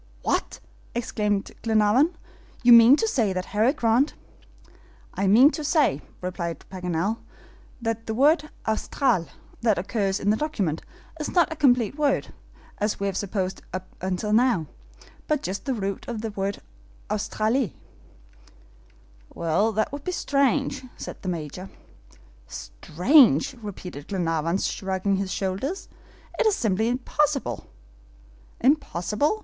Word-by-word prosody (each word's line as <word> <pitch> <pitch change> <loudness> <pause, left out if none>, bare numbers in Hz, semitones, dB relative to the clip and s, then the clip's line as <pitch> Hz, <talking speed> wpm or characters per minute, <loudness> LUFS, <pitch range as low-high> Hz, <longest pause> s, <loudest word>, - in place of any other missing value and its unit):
"What!" - - -1 0.4
exclaimed 210 -4 -1
Glenarvan, 225 +8 +3 0.5
"you 245 0 +8
mean 235 +3 +9
to 450 - 0
say 230 - +1
that 185 0 -3
Harry 220 +5 +4
Grant 250 0 +2 0.5
" - - -27
"I 195 - 0
mean 245 +9 +7
to 310 - -5
say," 290 - +2 0.2
replied 175 -2 -4
Paganel, 180 +3 -2 0.6
"that 225 -1 -3
the 220 - -2
word 300 +4 +3 0.2
AUSTRAL 220 - 0 0.3
that 220 -4 +3
occurs 195 +1 -1
in 205 - +2
the 215 - +1
document 200 - -1 0.4
is 300 - -3
not 345 -3 +2
a - - -10
complete 255 -3 +2
word, 285 -2 +1 0.5
as 210 0 -1
we 200 - -1
have 195 -2 -1
supposed 190 -2 -2
up 185 0 -5 0.3
till 210 +2 -2
now, 230 -7 +3 0.6
but 300 -2 0
just 190 +2 -4
the 270 - 0
root 200 -2 -4
of 230 -3 -4
the 225 - -3
word 200 0 -3 0.5
AUSTRALIE." 215 - 0 1.6
"Well, 170 +7 +1
that 215 +8 0
would 285 0 -6
be 365 - -2
strange," 275 -4 +1
said - - -8
the 185 - -3
Major. 175 +3 -5 0.8
"Strange!" 230 - +3
repeated 180 -8 -8
Glenarvan, 170 -2 0
shrugging 195 0 -1
his 190 -1 -3
shoulders; 200 - -3 0.5
"it - - +4
is 425 - +3
simply 220 0 +1
impossible." 275 +3 -1 0.9
"Impossible?" 275 - +1
215 Hz, 130 wpm, -25 LUFS, 190-270 Hz, 1.6 s, mean